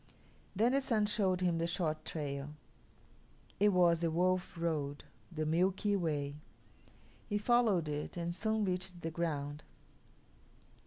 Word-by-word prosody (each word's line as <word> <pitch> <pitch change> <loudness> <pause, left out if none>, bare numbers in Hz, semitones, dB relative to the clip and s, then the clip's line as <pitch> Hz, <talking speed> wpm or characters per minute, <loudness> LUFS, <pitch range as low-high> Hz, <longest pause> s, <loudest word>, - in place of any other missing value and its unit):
Then 225 +5 +3
the 275 +1 +2
Sun 225 -5 +1
showed 195 -4 +1
him 175 -2 +1
the 165 - 0
short 160 -3 -2
trail. 145 -1 -4 1.0
It 210 +1 +5
was 175 -3 +4
the 165 - +2
Wolf 180 +2 0
Road 150 -4 -2 0.3
the 155 -2 -2
Milky 185 +5 +2
Way. 150 -5 -1 0.9
He 205 - +1
followed 210 -6 +3
it 150 +3 -4
and 170 0 -2
soon 220 +2 0
reached 180 -1 -3
the 165 - -2
ground. 150 -3 -2
170 Hz, 135 wpm, -34 LUFS, 155-195 Hz, 1.0 s, It